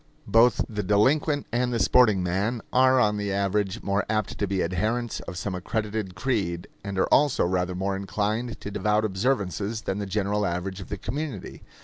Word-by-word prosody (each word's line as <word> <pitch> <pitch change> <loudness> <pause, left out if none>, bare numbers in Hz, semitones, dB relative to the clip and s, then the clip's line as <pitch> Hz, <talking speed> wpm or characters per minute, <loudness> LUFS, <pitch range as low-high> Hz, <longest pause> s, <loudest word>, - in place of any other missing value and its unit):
Both 115 +2 +4
the 105 -2 -3
delinquent 140 - +2
and 125 +1 0
the 120 - 0
sporting 110 -6 +4
man 100 +6 -1
are 130 0 +5
on 105 -2 +2
the 105 -1 -2
average 100 +2 -1
more 100 +1 +1
apt 110 -1 -1
to 100 - 0
be 95 -1 0
adherents 110 +7 -1
of 90 - -6
some 100 0 -3
accredited 105 +1 -3
creed, 90 -6 -1 0.2
and 100 -2 -5
are 95 - +3
also 145 -8 +4
rather 90 0 0
more 95 +1 -1
inclined 105 +4 -2
to 100 - -6
devout 105 +1 +1
observances, 105 0 -1
than 95 0 -3
the 100 - -3
general 105 +1 0
average 95 +1 -3
of 95 - -10
the 105 - -3
community. 140 - -5
105 Hz, 185 wpm, -26 LUFS, 95-115 Hz, 0.2 s, are